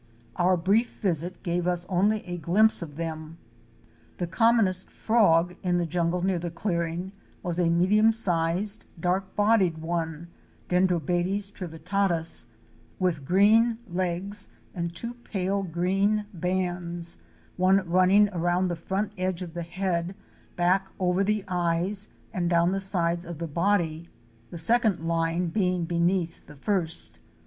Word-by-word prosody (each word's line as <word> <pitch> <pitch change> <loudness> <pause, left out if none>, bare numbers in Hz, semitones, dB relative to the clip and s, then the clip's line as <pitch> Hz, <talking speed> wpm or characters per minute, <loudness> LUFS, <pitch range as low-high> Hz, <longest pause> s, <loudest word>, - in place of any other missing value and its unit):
Our 180 +1 +3
brief 205 +8 +2
visit 175 -2 -1
gave 175 0 -1
us 175 -1 0
only 205 +3 +1
a 175 -1 -5
glimpse 205 +8 +3
of 150 -4 -7
them. 160 0 -6 0.8
The 175 - -2
commonest 195 0 +2
frog 180 -6 +2
in 180 -1 +1
the 175 - 0
jungle 170 +1 -1
near 185 -2 +1
the 175 +1 -4
clearing 170 0 -3 0.3
was 175 0 -2
a 170 -2 +3
medium 200 +6 +4
sized, 185 -1 +1
dark 185 +3 -1
bodied 205 -5 +3
one 165 0 -3 0.4
(Dendrobates 180 +2 +1
trivittatus) 170 -4 +1 0.5
with 170 -7 -1
green 220 - +4
legs 185 +2 -2 0.2
and 170 -2 -4
two 235 +6 -4
pale 200 -5 -2
green 195 +4 0
bands, 175 -1 -2 0.4
one 185 0 +3
running 185 +4 +5
around 175 0 0
the 175 - -2
front 190 +5 -3
edge 185 -1 -1
of 170 -2 -9
the 175 - -4
head, 175 +1 -2 0.4
back 185 +2 +1
over 180 +1 +1
the 210 0 0
eyes 180 +3 0 0.2
and 175 -2 -1
down 170 0 +3
the 195 - -1
sides 175 -3 +1
of 170 -2 -7
the 170 - -4
body; 170 -1 0 0.4
the 175 - -8
second 210 -2 +2
line 165 +1 0
being 180 -2 0
beneath 170 +1 -1
the 150 - -12
first. 165 +1 -2
180 Hz, 140 wpm, -26 LUFS, 170-195 Hz, 0.8 s, running